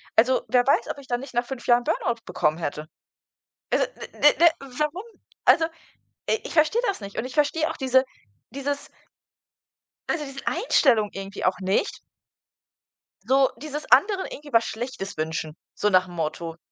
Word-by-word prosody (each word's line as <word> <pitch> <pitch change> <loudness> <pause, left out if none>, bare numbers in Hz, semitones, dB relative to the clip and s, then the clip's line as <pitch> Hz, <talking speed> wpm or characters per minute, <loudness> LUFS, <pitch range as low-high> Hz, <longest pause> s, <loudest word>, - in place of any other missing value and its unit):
Also, 250 +3 +4
wer 245 -1 +3
weiß, 275 - +3
ob 285 - -8
ich 275 - -14
dann 245 -1 -1
nicht 270 -2 -10
nach 240 0 0
5 260 -2 -7
Jahren 240 0 +5
Burn-out 235 -1 -1
bekommen 155 +2 0
hätte? 150 -1 -4 0.9
Also, - - +3
ne, - - -9
ne, 295 - +7
ne, - - +10
warum? 300 - -3 0.4
Also, 320 - +5 0.6
i 445 - +2
ich - - -7
verstehe 315 +9 +3
das 395 - -2
nicht. 200 0 -9
Und 230 - -1
ich 255 - -7
verstehe 305 +1 +2
auch - - -5
diese 260 0 +3 0.5
dieses 280 +2 -4 1.2
also 305 - -1
diese 275 -1 -8
Einstellung 260 - +3
irgendwie 195 +1 -5
auch 185 0 +2
nicht 190 - 0 1.3
so 270 0 +4
dieses 300 +2 -6
anderen 380 - +4
irgendwie 290 -1 -9
was 230 0 +4
Schlechtes 220 -4 -5
wünschen, 155 0 -3 0.2
so 210 - 0
nach'm 185 -2 +2
Motto. 165 +1 -3
255 Hz, 165 wpm, -25 LUFS, 200-290 Hz, 1.3 s, ne